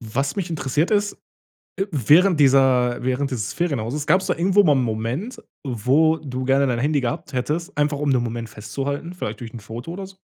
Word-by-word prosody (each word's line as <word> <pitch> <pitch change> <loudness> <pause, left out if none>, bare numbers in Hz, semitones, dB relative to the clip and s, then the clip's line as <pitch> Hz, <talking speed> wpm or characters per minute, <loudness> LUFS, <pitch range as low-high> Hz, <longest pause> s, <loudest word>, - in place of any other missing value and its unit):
Was 135 +5 -2
mich 190 -3 -3
interessiert, 150 0 0
ist, 205 -1 +1 0.6
äh, 195 - 0
während 155 - +4
dieser 130 -3 +4
während 130 +2 -1
dieses 110 -4 -3
Ferienhauses 145 -4 -2
gab's 190 +1 +3
da - - +1
irgendwo 190 +4 +3
mal 150 -4 +5
'n 130 - +2
Moment, 125 - -3 0.2
wo 135 +7 +2
du 130 -4 -5
gerne 135 +1 +3
dein 120 -2 0
Handy 145 +2 +1
gehabt 125 +3 -4
hättest, 150 +6 -3
einfach 145 0 +1
um 145 -1 +1
den 125 -2 +2
Moment 115 -1 -4
festzuhalten, 140 - -5
vielleicht 110 -11 -5
durch 115 -1 -8
'n 120 - -7
Foto 115 +9 -8
oder 195 +2 -6
s 190 0 -12
140 Hz, 200 wpm, -22 LUFS, 120-160 Hz, 0.6 s, mal